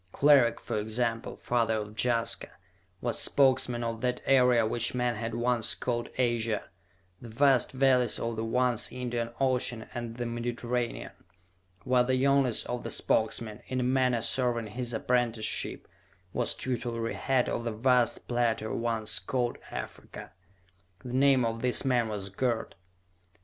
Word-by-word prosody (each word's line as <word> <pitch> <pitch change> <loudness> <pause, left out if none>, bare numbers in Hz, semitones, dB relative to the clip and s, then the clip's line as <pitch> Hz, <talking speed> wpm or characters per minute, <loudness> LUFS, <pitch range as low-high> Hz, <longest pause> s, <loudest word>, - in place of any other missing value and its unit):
Cleric, 140 -4 +4
for - - -3
example, 115 +2 -2
father 115 -2 0
of 105 0 -6
Jaska, 115 -2 0 0.5
was - - -2
Spokesman 130 -3 +2
of 115 -1 -3
that 125 -1 0
area 125 -4 +4
which 115 +2 0
men 125 -1 0
had 115 +1 -4
once 120 -1 +1
called 120 -1 -3
Asia, 115 -3 0 0.6
the 120 - -9
vast 130 +2 +3
valleys 130 -3 +3
of 115 0 -3
the 110 - -3
once 125 0 0
Indian 120 -2 -3
Ocean 125 -3 0
and 120 -1 -6
the 120 - -3
Mediterranean; 120 0 -3 0.7
while 125 -1 +3
the 130 +1 +1
youngest 135 -2 +3
of 125 0 -4
the - - -5
Spokesmen, 110 -1 0
in 130 - -2
a - - 0
manner 125 -2 +2
serving 120 -4 0
his 120 +2 -3
apprenticeship, 115 -1 0 0.5
was - - +1
tutelary 120 -2 -2
head 130 -2 +1
of 120 - -2
the 115 - -2
vast 120 +1 +1
plateau 120 -2 0
once 115 -1 0
called 125 -2 -2
Africa. - - -8 0.7
The 125 - -6
name 135 -1 +4
of 115 0 -3
this 125 +2 +1
man 125 -3 +2
was 100 -2 -5
Gerd. 115 +2 -1
120 Hz, 145 wpm, -29 LUFS, 115-125 Hz, 0.7 s, Cleric